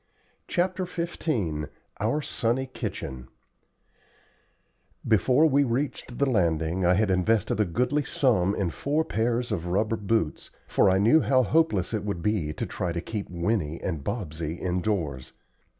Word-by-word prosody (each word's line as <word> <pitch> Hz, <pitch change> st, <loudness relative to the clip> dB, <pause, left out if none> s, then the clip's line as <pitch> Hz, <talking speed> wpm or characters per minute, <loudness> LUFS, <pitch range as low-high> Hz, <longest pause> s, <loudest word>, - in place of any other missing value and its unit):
CHAPTER 185 Hz, +1 st, 0 dB
XV 120 Hz, -, -2 dB, 0.3 s
OUR 115 Hz, +9 st, 0 dB
SUNNY 120 Hz, +2 st, 0 dB
KITCHEN 65 Hz, -1 st, -5 dB, 1.8 s
Before 125 Hz, -, +4 dB
we 140 Hz, -2 st, +4 dB
reached 130 Hz, -1 st, -2 dB
the 140 Hz, -, +2 dB
landing 85 Hz, -, +1 dB
I 90 Hz, +1 st, +4 dB
had 105 Hz, 0 st, +2 dB
invested 100 Hz, +3 st, +1 dB
a 105 Hz, -, +4 dB
goodly 125 Hz, -, 0 dB
sum 105 Hz, -10 st, +2 dB
in 90 Hz, -4 st, -1 dB
four 150 Hz, -, 0 dB
pairs 120 Hz, +2 st, -1 dB
of 90 Hz, -4 st, -2 dB
rubber 105 Hz, +5 st, +1 dB
boots, 105 Hz, -7 st, -1 dB, 0.2 s
for -, -, +3 dB
I 95 Hz, -, +3 dB
knew 115 Hz, +11 st, +5 dB
how 130 Hz, -2 st, +3 dB
hopeless 115 Hz, -, +1 dB
it 105 Hz, -2 st, -1 dB
would 100 Hz, -5 st, -3 dB
be 95 Hz, -8 st, 0 dB
to -, -, -4 dB
try 90 Hz, -, -3 dB
to 85 Hz, -, -2 dB
keep 105 Hz, +3 st, -5 dB
Winnie 85 Hz, -3 st, -1 dB
and 80 Hz, -6 st, -3 dB
Bobsey 80 Hz, -, -4 dB
indoors. 90 Hz, -7 st, -2 dB
105 Hz, 145 wpm, -26 LUFS, 85-125 Hz, 1.8 s, knew